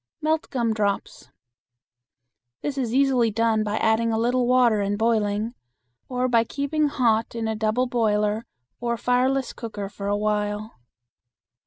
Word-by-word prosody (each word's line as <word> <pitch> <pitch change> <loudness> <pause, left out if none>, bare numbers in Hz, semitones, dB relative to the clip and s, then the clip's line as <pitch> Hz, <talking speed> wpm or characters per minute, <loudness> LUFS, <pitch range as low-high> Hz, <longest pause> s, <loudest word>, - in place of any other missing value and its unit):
Melt 315 0 0
gum 235 -4 0
drops. 205 -2 -2 1.3
This 290 - -2
is 255 -5 -2
easily 260 -3 +3
done 225 0 +1
by 210 0 -2
adding 225 +1 +2
a 220 - 0
little 245 +2 +1
water 245 -4 +4
and 200 +1 -1
boiling, 220 0 0 0.6
or 250 0 0
by 230 -2 +3
keeping 285 +5 -1
hot 230 -5 +1
in 225 -1 -2
a 220 - -1
double 220 +3 +1
boiler 215 -2 0 0.3
or 235 -1 -1
fireless 255 +3 +1
cooker 210 -4 -6
for 200 0 -6
a 205 0 +1
while. 210 - -2
230 Hz, 145 wpm, -24 LUFS, 215-250 Hz, 1.3 s, water